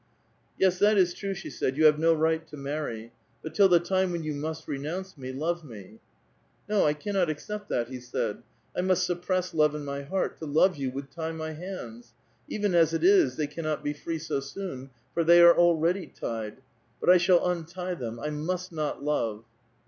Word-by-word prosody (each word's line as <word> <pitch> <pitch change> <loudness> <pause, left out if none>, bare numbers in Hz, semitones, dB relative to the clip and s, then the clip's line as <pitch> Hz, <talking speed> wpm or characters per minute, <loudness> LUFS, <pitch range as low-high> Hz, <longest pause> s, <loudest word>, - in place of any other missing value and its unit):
*'Yes, 185 -1 +2
that 210 +1 +4
is 180 -2 +4
true," 195 +1 -4
she 195 - -7
said; 130 +1 -2
"you 155 - +4
have 150 0 +6
no 165 +1 +4
right 160 0 +1
to 150 - -10
marry. 140 -5 -4 0.3
But 160 - -6
till 195 +3 +5
the 175 -1 +6
time 185 +1 0
when 170 -2 -3
you 155 -1 -2
must 155 +2 -5
renounce 170 +7 -4
me, 130 -3 -7
love 165 +5 -2
me." 110 -5 -12 0.3
" - - -39
No, 210 -6 +3
I 150 - +2
cannot 185 +2 0
accept 205 +7 -5
that," 120 -1 0
he 130 -1 -6
said. 125 0 -3 0.2
" - - -39
I - - 0
must 185 -1 +2
suppress 180 0 -1
love 150 -2 +3
in 150 -1 -5
my 140 0 -4
heart; 185 +7 -2
to 160 - -6
love 160 +5 +3
you 135 -2 -2
would 135 +2 -7
tie 160 -1 -4
my 160 0 -5
hands. 120 -9 -8 0.3
Even 205 -3 -1
as 165 -1 +4
it - - -2
is, 375 -2 +5
they 155 - -1
cannot 155 0 -4
be 145 - -1
free 165 +3 -4
so 155 -3 -2
soon, 135 -1 -7 0.2
for 170 - +1
they 170 +1 +7
are 170 0 +9
already 175 +1 +3
tied. 115 +1 -6 0.4
But - - +4
I 180 - +8
shall 175 0 +4
untie 180 +1 -3
them; 120 -8 -5
I 150 +5 -3
must 180 +5 -3
not 155 -3 -3
love." 115 -7 -1
160 Hz, 210 wpm, -27 LUFS, 145-180 Hz, 0.4 s, are